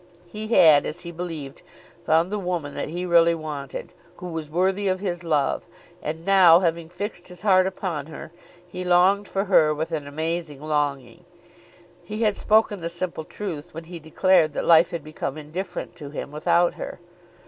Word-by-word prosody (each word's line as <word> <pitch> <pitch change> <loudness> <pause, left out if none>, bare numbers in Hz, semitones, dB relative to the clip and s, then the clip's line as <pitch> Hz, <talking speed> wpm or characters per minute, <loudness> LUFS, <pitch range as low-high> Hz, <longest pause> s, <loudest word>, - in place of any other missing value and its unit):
He 215 +5 -7
had, 160 -10 +6
as 175 - -6
he 170 -1 -7
believed, 165 -5 -6 0.4
found 165 +4 +2
the 210 - -1
woman 175 -6 -3
that - - -4
he 175 +3 -4
really 170 -1 +4
wanted, 150 -4 -6 0.2
who 180 - -8
was 160 -2 -5
worthy 190 +5 0
of 185 0 0
his 180 -3 -3
love, 150 -4 0 0.3
and 160 +2 -5
now, 185 -4 +7
having 170 -2 -1
fixed 180 0 -6
his 180 0 -12
heart 190 -2 +4
upon 175 -6 -4
her, 160 0 -9 0.4
he 180 +1 -6
longed 185 +3 +3
for 195 - -1
her 155 -6 +4
with 160 +2 -3
an 150 -3 -3
amazing 160 0 -3
longing. 145 -3 -2 0.8
He 215 +2 -4
had 210 -2 +2
spoken 215 -3 +2
the 165 - -3
simple 170 -1 -4
truth 175 -5 -7
when 165 - -6
he 170 +1 -9
declared 160 0 +2
that - - -3
life 165 0 +6
had 170 -3 -5
become 155 -2 -5
indifferent 175 +5 -6
to 145 - -8
him 145 -1 -6
without 170 +3 +2
her. - - -7
170 Hz, 180 wpm, -24 LUFS, 155-185 Hz, 0.8 s, now